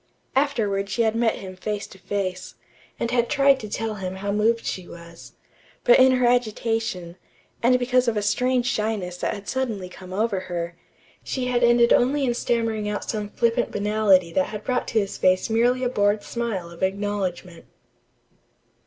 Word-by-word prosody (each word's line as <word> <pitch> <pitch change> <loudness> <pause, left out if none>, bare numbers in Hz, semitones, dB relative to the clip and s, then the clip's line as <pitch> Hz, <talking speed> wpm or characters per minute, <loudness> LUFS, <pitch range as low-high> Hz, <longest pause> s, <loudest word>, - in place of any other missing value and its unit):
Afterward 215 -8 0
she 230 +4 +1
had 220 -1 +2
met 230 -1 +2
him 185 -1 -8
face 205 +2 -4
to 190 - -15
face, 185 -2 -4 0.4
and 235 - -1
had 240 -1 +1
tried 275 -2 +4
to 215 - -7
tell 225 +1 -2
him 185 0 -4
how 200 +1 -3
moved 225 +3 +1
she 185 -2 -4
was; 170 0 -12 0.5
but 240 - +6
in 260 0 +6
her 250 -1 +2
agitation, 225 -7 0 0.4
and 250 +2 +4
because 250 0 +1
of 225 -2 +1
a 210 - 0
strange 250 +4 +1
shyness 210 -6 -2
that - - -2
had 200 -1 -10
suddenly 225 -8 -2
come 185 0 -12
to 200 +1 0
her, 170 -2 -5 0.5
she 260 -2 -3
had 245 -1 +1
ended 240 0 +5
only 275 +3 +2
in 245 - +1
stammering 225 -3 -1
out 210 - -4
some 210 -2 -3
flippant 235 +2 +1
banality 205 -4 +2
that 185 - +2
had 210 -1 -7
brought 250 -1 -1
to 225 - +1
his 200 -2 -3
face 185 +4 +2
merely 245 +3 +2
a - - +2
bored 205 -2 +1
smile 215 -8 -4
of 170 - -13
acknowledgment. 190 -3 -2
215 Hz, 180 wpm, -24 LUFS, 190-240 Hz, 0.5 s, but